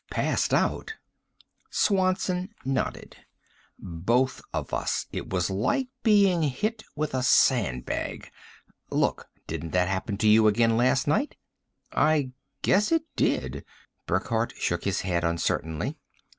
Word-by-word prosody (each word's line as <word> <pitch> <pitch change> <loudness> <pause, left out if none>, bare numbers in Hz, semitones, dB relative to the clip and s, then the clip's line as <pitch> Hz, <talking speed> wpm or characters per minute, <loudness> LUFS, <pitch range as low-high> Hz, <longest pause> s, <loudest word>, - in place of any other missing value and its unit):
"Passed - - 0
out?" 445 - 0 0.7
Swanson 185 0 +1
nodded. 135 -1 -3 0.6
"Both 115 +10 0
of - - -4
us. - - -1
It - - -5
was 90 0 0
like 250 - 0
being 200 -6 +4
hit 210 - -1
with 150 -1 -2
a 130 - 0
sandbag. 105 - +1 0.6
Look, - - 0 0.2
didn't 80 - -5
that 90 0 +2
happen 95 +1 -2
to 110 - +1
you 110 +1 +6
again 115 +2 +3
last 125 +3 +2
night?" 215 - +1 0.6
"I 150 -4 +2 0.3
guess 210 +7 +3
it 325 -1 +3
did," - - 0 0.4
Burckhardt 115 +1 0
shook 85 0 -1
his 100 -2 0
head 90 -2 -1
uncertainly. 85 - -1
125 Hz, 120 wpm, -26 LUFS, -, 0.7 s, you